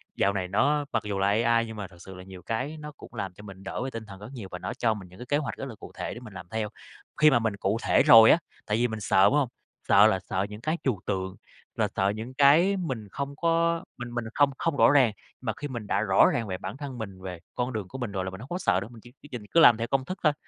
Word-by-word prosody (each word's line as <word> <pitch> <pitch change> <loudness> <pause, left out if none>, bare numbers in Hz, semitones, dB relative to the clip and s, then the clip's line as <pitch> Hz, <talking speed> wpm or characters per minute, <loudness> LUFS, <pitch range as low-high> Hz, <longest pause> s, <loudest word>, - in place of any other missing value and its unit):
dạo 100 0 +2
này 95 -2 -2
nó 145 +10 +2
mặc - - 0
dù 100 -2 -3
là 100 - +2
AI 115 +2 +3
nhưng 110 -1 -8
mà 100 -2 -5
thật 90 - -18
sự 95 +2 -11
là 90 - -10
nhiều 95 -1 -11
cái 130 - -3
nó 150 0 -8
cũng - - -13
làm 100 -5 -4
cho 105 - -14
mình 100 -2 -11
đỡ 95 - -4
về 135 - -3
tinh 115 -2 -7
thần 100 -2 -11
rất 105 - -9
nhiều, 110 -7 -7
và 90 - -6
nó 90 - -4
cho 115 -2 +1
mình 100 -4 -9
những 90 - -16
cái 125 - -7
kế 145 +3 +1
hoạch 150 - -3
rất - - -5
là 130 -5 -8
cụ - - -12
thể - - -4
để 120 - -8
mình 110 -5 -12
làm 95 - -9
theo. 110 -1 -2 0.5
Khi 155 - +8
mà 120 - +4
mình 110 -3 -1
cụ 100 +2 0
thể - - +4
rồi 115 -1 +9
á, - - +6 0.3
tại 105 +1 0
vì 120 +1 +2
mình 110 -1 -5
sợ, 95 0 +3
đúng 100 - +4
hông? 145 -5 +2 0.4
Sợ 100 +2 +7
là 95 -4 +1
sợ 95 +1 0
những 105 +1 -9
cái 155 +6 -1
trừu 120 -9 0
tượng, 95 -1 -2 0.4
là - - +1
sợ 95 +1 +2
những 115 +4 -7
cái 155 +8 +5
mình 130 - -4
không 140 +4 -4
có 170 +1 +1
mình 120 -1 -7
mình 120 -1 -2
không 145 -1 +4
không 165 -4 -1
rõ - - +6
ràng, 130 -6 +5 0.3
mà 110 -4 -2
khi 145 - -4
mình 120 -6 -6
đã 100 - +1
rõ 95 -3 +5
ràng 115 -2 -1
về 95 -2 -3
bản 120 - -7
thân 140 -3 -7
mình, 100 -5 -7
về 90 -2 -7 0.2
con 125 0 -2
đường 105 -4 -4
của 130 - -8
mình 120 -5 -4
rồi 95 -2 -2
là - - -3
mình 95 - -9
hông 125 +5 -10
có 175 - -2
sợ 100 - +2
nữa, 100 - -6
mình 115 -2 -13
chỉ 120 +1 -15
cứ 145 - -13
nhìn, 120 -4 -6
cứ 165 - +4
làm 120 -8 +8
theo 115 +1 -2
công 135 -1 0
thức 185 - -5
thôi. 150 -2 +4
115 Hz, 310 wpm, -27 LUFS, 100-135 Hz, 0.5 s, rồi